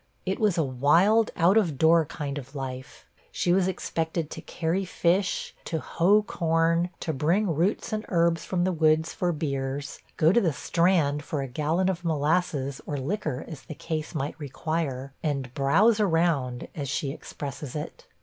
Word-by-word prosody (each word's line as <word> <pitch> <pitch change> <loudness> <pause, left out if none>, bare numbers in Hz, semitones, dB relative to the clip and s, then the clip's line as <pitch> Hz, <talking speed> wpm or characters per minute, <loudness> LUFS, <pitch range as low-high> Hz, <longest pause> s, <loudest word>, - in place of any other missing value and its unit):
It 190 - -1
was 210 -5 +2
a 165 - +3
wild, 165 - +3
out 180 +5 +4
of 170 -10 +2
door 160 +2 +5
kind 145 -1 -4
of 135 +1 -12
lief. 130 -1 -7 0.3
She 175 - +1
was 185 0 +3
expected 165 -3 -2
to - - -6
carry 170 +3 -2
fish, 185 +1 0
to 165 - -2
hoe 195 +7 +3
corn, 165 -1 +1
to 160 - -2
bring 170 +7 +1
roots 185 +7 0
and 215 0 -1
herbs 170 -2 +2
from 180 -2 -1
the 185 - +2
woods 160 -1 +2
for 180 -1 0
beers, 140 -3 -3 0.2
go 160 +1 +5
to 235 - +4
the 165 -6 +1
Strand 165 -3 +1
for 145 -2 -3
a - - -4
gallon 155 +8 0
of 180 -2 -1
molasses 150 -3 0
or 145 - -2
liquor 150 -2 -3
as 155 -5 -8
the 140 +5 -9
case 155 0 -4
might 145 +2 -3
require, 140 -2 -3
and 135 -5 -2
'browse 200 - +3
around,' 165 -10 +1
as 140 -4 -4
she 140 0 -1
expresses 140 -2 -7
it. 170 - -6
160 Hz, 170 wpm, -26 LUFS, 140-180 Hz, 0.3 s, door